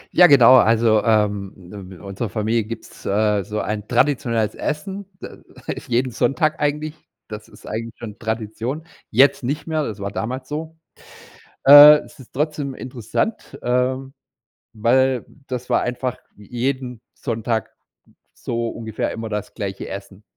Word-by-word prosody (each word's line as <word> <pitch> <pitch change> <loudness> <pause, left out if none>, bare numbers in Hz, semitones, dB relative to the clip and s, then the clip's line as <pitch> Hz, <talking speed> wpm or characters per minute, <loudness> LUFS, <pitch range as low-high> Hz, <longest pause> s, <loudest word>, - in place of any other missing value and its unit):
Ja 180 0 +8
genau, 130 -3 +8
also, 115 -2 +4
ähm, 105 -3 +1 0.4
i 95 - -10
in - - -15
unserer 100 +3 -5
Familie 110 +2 0
gibt's, 115 +1 -9
äh, 105 0 +1
so 105 +2 -4
ein 105 -1 -4
traditionelles 120 -4 +1
Essen. 190 +6 -4
D - - -7 0.5
ist - - -10
jeden 125 +2 +1
Sonntag 135 +7 0
eigentlich, 150 +1 -1 0.4
das 105 -1 -8
ist - - -17
eigentlich 115 +1 -5
schon 110 -2 -9
Tradition. 115 +6 -4 0.2
Jetzt 135 +4 +4
nicht 140 +5 -2
mehr, 155 -2 -1
das 105 -5 -5
war 100 0 -4
damals 130 +5 -4
so. 160 +2 -6 0.9
Äh, 145 +2 +10
es - - -15
ist 130 - -15
trotzdem 145 -1 -2
interessant, 130 - -4
ähm, 130 +2 -1 0.6
weil 125 +3 +2 0.2
das 125 -1 -5
war - - +2
einfach 125 0 -3 0.2
j 105 -1 -16
jeden 125 -1 -3
Sonntag 115 -2 -2 0.6
so 115 -1 -3
ungefähr 110 -2 -4
immer 115 0 -5
das 105 -1 -4
gleiche 100 -3 -5
Essen. 100 +1 -9
120 Hz, 145 wpm, -21 LUFS, 110-135 Hz, 0.9 s, Äh